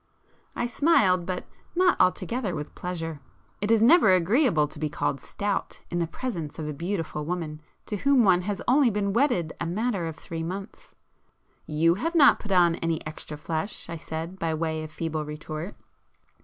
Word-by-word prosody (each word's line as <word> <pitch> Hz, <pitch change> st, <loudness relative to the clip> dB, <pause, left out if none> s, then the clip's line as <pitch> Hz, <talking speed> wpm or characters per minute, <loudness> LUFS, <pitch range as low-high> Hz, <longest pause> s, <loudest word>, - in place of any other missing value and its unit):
I 240 Hz, -, -1 dB
smiled, 210 Hz, -, +3 dB
but 180 Hz, -1 st, -3 dB, 0.3 s
not 365 Hz, 0 st, +4 dB
altogether 205 Hz, +1 st, +1 dB
with 150 Hz, 0 st, -6 dB
pleasure; 165 Hz, -4 st, -5 dB, 0.4 s
it 205 Hz, -, -1 dB
is 225 Hz, -1 st, +5 dB
never 305 Hz, -, +7 dB
agreeable 185 Hz, -, +3 dB
to 145 Hz, -, -12 dB
be 155 Hz, 0 st, -1 dB
called 145 Hz, -1 st, -1 dB
'stout' 200 Hz, +9 st, -3 dB
in 175 Hz, -, 0 dB
the 170 Hz, -, 0 dB
presence 170 Hz, -, -5 dB
of 155 Hz, -2 st, -4 dB
a 150 Hz, -, -3 dB
beautiful 165 Hz, -1 st, -3 dB
woman 155 Hz, -2 st, -4 dB, 0.2 s
to 210 Hz, -, -3 dB
whom 275 Hz, +3 st, +4 dB
one 180 Hz, -3 st, +5 dB
has 200 Hz, +2 st, -3 dB
only 265 Hz, 0 st, +5 dB
been 200 Hz, -2 st, -1 dB
wedded 200 Hz, -, +1 dB
a 170 Hz, -, -1 dB
matter 200 Hz, -1 st, -1 dB
of 160 Hz, -, -5 dB
three 165 Hz, +1 st, -6 dB
months. 190 Hz, +5 st, -7 dB, 0.7 s
"You 160 Hz, +2 st, +3 dB
have 330 Hz, +2 st, -1 dB
not 290 Hz, -4 st, +7 dB
put 210 Hz, -, -7 dB
on 175 Hz, -3 st, +4 dB
any 165 Hz, -1 st, -2 dB
extra 155 Hz, -1 st, -7 dB
flesh;—" 160 Hz, +6 st, -4 dB
I -, -, -3 dB
said, 165 Hz, +3 st, -6 dB
by 165 Hz, -1 st, 0 dB
way 160 Hz, 0 st, -2 dB
of 155 Hz, -, -7 dB
feeble 155 Hz, -1 st, -3 dB
retort. 155 Hz, +4 st, -6 dB
175 Hz, 180 wpm, -26 LUFS, 160-210 Hz, 0.7 s, never